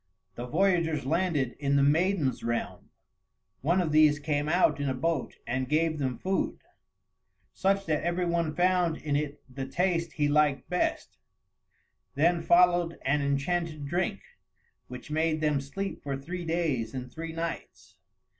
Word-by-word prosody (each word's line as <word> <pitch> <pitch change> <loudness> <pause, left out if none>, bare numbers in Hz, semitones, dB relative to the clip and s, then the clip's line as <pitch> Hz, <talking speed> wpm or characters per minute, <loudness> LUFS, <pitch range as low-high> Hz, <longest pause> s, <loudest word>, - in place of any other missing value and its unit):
The 120 +5 -6
voyagers 165 -2 +1
landed 155 -4 0
in 140 -1 +1
the 140 - +4
maidens' 155 -1 +2
realm; 120 0 -3 0.7
one 170 +7 +2
of 170 -4 0
these 155 -1 +5
came 145 0 -1
out 175 -3 +3
in 140 -1 -1
a 130 - -1
boat 155 +1 -1
and 130 +2 -2
gave 155 0 +1
them 130 -3 -1
food, 190 +1 -1 1.0
such 195 +1 +1
that 155 -2 0
every 175 +1 -1
one 170 -3 0
found 180 -2 +2
in 145 -2 -2
it 145 0 -3
the 135 +1 -6
taste 170 +1 0
he 150 -2 +1
liked 145 -2 +2
best; 180 - -1 1.0
then 170 +4 +3
followed 175 -1 +4
an 140 +2 +2
enchanted 150 +2 -1
drink, 170 - -1 0.7
which 125 +4 -9
made 155 0 +1
them 150 -3 +1
sleep 195 +9 -5
for 140 -1 -3
three 175 +6 -6
days 150 -9 -1
and 125 -1 -6
three 165 0 -5
nights. 95 - -6
155 Hz, 150 wpm, -28 LUFS, 140-170 Hz, 1.0 s, these